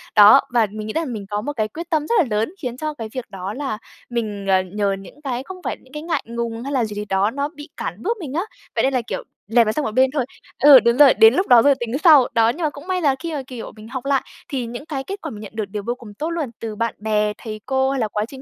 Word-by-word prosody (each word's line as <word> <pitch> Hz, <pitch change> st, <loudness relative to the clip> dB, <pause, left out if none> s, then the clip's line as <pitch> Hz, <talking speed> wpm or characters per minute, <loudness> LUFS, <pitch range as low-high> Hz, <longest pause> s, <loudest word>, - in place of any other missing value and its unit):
Đó, 210 Hz, +6 st, +9 dB
và 230 Hz, -3 st, +4 dB
mình 215 Hz, 0 st, -6 dB
nghĩ 215 Hz, -, -4 dB
rằng 320 Hz, -6 st, -2 dB
mình 205 Hz, -3 st, -6 dB
có 205 Hz, 0 st, -2 dB
một 290 Hz, +7 st, -4 dB
cái 215 Hz, -5 st, -1 dB
quyết 335 Hz, +9 st, -8 dB
tâm 310 Hz, -3 st, 0 dB
rất 470 Hz, -, +1 dB
là 340 Hz, -, +4 dB
lớn, 225 Hz, +11 st, -1 dB
khiến 245 Hz, -2 st, -4 dB
cho 305 Hz, +2 st, -3 dB
cái 225 Hz, -6 st, -6 dB
việc 255 Hz, -3 st, -4 dB
đó 190 Hz, +1 st, -5 dB
là 265 Hz, -4 st, -3 dB, 0.3 s
mình, 215 Hz, -4 st, -3 dB
ờ, 190 Hz, -1 st, +4 dB
nhờ 200 Hz, +2 st, -1 dB
những 195 Hz, +10 st, -14 dB
cái 260 Hz, -2 st, -3 dB
không 375 Hz, +3 st, -9 dB
phải -, -, -3 dB
những 260 Hz, -, -22 dB
cái 300 Hz, -, -6 dB
ngại 330 Hz, 0 st, -1 dB
ngùng 235 Hz, 0 st, -4 dB
hay 280 Hz, +2 st, -4 dB
là 245 Hz, -4 st, +2 dB
gì 210 Hz, -1 st, -7 dB
gì 210 Hz, 0 st, -4 dB
đó 195 Hz, +2 st, +1 dB
nó 285 Hz, +2 st, -2 dB
bị 295 Hz, +2 st, -10 dB
cản -, -, -5 dB
bước 465 Hz, 0 st, 0 dB
mình 285 Hz, -5 st, -6 dB
á. 335 Hz, -, 0 dB, 0.3 s
Vậy -, -, +2 dB
nên 270 Hz, 0 st, +2 dB
là, 255 Hz, -, +2 dB
kiểu, 230 Hz, -, -5 dB, 0.2 s
dẹp 230 Hz, +1 st, +4 dB
nó 215 Hz, -, +1 dB
sang 300 Hz, +5 st, -2 dB
một -, -, -2 dB
bên 260 Hz, +1 st, +4 dB
thôi 275 Hz, -5 st, 0 dB, 0.4 s
ừ, 280 Hz, -3 st, +10 dB
đúng 235 Hz, +1 st, +2 dB
rồi, 290 Hz, -3 st, +8 dB
đến 225 Hz, +2 st, +7 dB
lúc 375 Hz, +7 st, +1 dB
đó 240 Hz, -2 st, +8 dB
rồi 280 Hz, +1 st, +5 dB
tính 240 Hz, +2 st, -2 dB
sau. 300 Hz, -7 st, +8 dB
Đó, 225 Hz, -1 st, +4 dB
nhưng 325 Hz, +8 st, -3 dB
mà 305 Hz, -, +2 dB
cũng 290 Hz, +4 st, -12 dB
may 370 Hz, -1 st, 0 dB
là 280 Hz, -4 st, +3 dB
khi 330 Hz, -1 st, -5 dB
mà, 280 Hz, -3 st, -3 dB
kiểu, 245 Hz, -3 st, -7 dB
mình 215 Hz, 0 st, -12 dB
học 260 Hz, +1 st, -5 dB
lại 275 Hz, -1 st, +2 dB, 0.3 s
thì 260 Hz, -5 st, -2 dB
những 240 Hz, +5 st, -7 dB
cái 275 Hz, -4 st, -4 dB
kết 395 Hz, +6 st, -6 dB
quả -, -, -5 dB
mình 210 Hz, -, -8 dB
nhận 210 Hz, -, -9 dB
được 220 Hz, -, -2 dB
đều 200 Hz, +1 st, -6 dB
vô 240 Hz, -, 0 dB
cùng 230 Hz, -5 st, -12 dB
tốt 310 Hz, +10 st, -3 dB
luôn. 325 Hz, -7 st, -2 dB
Từ 220 Hz, -2 st, -5 dB
bạn 230 Hz, +1 st, -2 dB
bè, 210 Hz, 0 st, 0 dB
thầy 215 Hz, -2 st, -7 dB
cô 265 Hz, 0 st, +1 dB
hay 275 Hz, -, -1 dB
là 220 Hz, -, +1 dB
quá 210 Hz, 0 st, -2 dB
trình 265 Hz, +1 st, -11 dB
245 Hz, 310 wpm, -21 LUFS, 215-285 Hz, 0.4 s, ừ